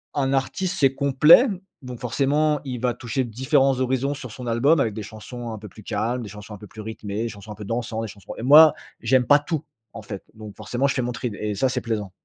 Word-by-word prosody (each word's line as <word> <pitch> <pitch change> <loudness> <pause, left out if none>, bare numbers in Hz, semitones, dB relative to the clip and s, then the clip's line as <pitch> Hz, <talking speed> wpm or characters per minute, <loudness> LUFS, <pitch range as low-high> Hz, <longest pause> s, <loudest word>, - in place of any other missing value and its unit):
un 135 -1 +1
artiste, 140 +7 -1
c'est 135 -2 +3
complet. 145 - +6 0.3
Donc 125 -2 -8
forcément, 145 +4 +1
il 125 -3 -5
va 125 -1 0
toucher 120 +2 -2
différents 130 +3 +2
horizons 130 +2 0
sur 130 -5 -8
son 125 +1 -8
album. 140 +7 +3
Avec 110 -5 +1
des 110 -1 -6
chansons 115 +3 -8
un 110 - -6
peu 105 - -9
plus 105 +2 -14
calmes, 120 +4 -2
des 105 - -8
chansons 105 +1 -10
un - - -8
peu 105 - -12
plus 110 - -14
rythmées, 110 0 -4
chansons 105 -1 -10
un - - -7
peu 105 0 -9
dansant, 115 0 -3
des 115 - -3
chansons. 100 0 -10
Et - - -6
moi, 150 +4 +8 0.3
j'aime 125 +2 +3
pas 145 - +6
tout 150 +1 -3 0.3
en 115 - -8
fait. 100 -2 -8
Donc 110 -2 -10
forcément, 120 +6 -1
je 130 - 0
fais 130 - -1
mon 120 - -2
trie 115 -2 -4
et 105 -1 -2
ça, 130 +7 +1
c'est 125 -1 -2
plaisant. 105 -5 -3
120 Hz, 245 wpm, -23 LUFS, 110-135 Hz, 0.3 s, moi